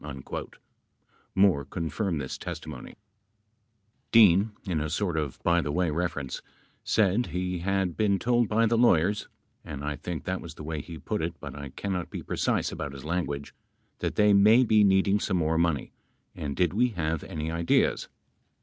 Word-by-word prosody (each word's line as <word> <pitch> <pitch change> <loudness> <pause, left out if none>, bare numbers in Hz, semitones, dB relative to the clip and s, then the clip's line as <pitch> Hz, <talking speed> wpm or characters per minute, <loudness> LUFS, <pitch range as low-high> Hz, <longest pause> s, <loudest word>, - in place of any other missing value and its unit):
11 70 -3 -7 1.2
Moore 95 -7 +4
confirmed 80 +4 -3
this 65 -2 -4
testimony: 80 -6 -7 1.2
Dean, 105 -2 +6
in 85 -6 -1
a 75 - -2
sort 90 +1 -1
of 75 -4 -2
by 85 0 +3
the 75 - -3
way 85 +1 +1
reference, 75 -5 -3 0.4
said 110 +3 +2
he 90 0 -3
had 95 -1 0
been 105 -2 +2
told 120 +1 +1
by 115 +2 +3
the 115 0 +2
lawyers 105 -3 +3 0.2
— - - -44
and 70 -2 -7
I 75 0 -2
think 80 -1 -5
that - - -3
was - - -9
the - - -9
way 80 -1 -4
he 80 +2 -9
put 75 - -3
it, - - -3
but - - -7
I 70 -1 -7
cannot 95 +4 -4
be - - -6
precise - - 0
about 70 - -5
his 70 0 -10
language 75 -4 -3 0.2
— - - -44
that - - -2
they 105 0 +5
may 110 +5 +6
be 110 -3 +4
needing 100 +1 +3
some 95 -2 0
more 80 -1 +1
money, 85 -5 0 0.4
and 70 -2 -5
did 90 -1 +1
we 120 +5 +3
have 80 -2 -1
any 80 -3 -4
ideas 85 0 +1
85 Hz, 180 wpm, -27 LUFS, 75-100 Hz, 1.2 s, Dean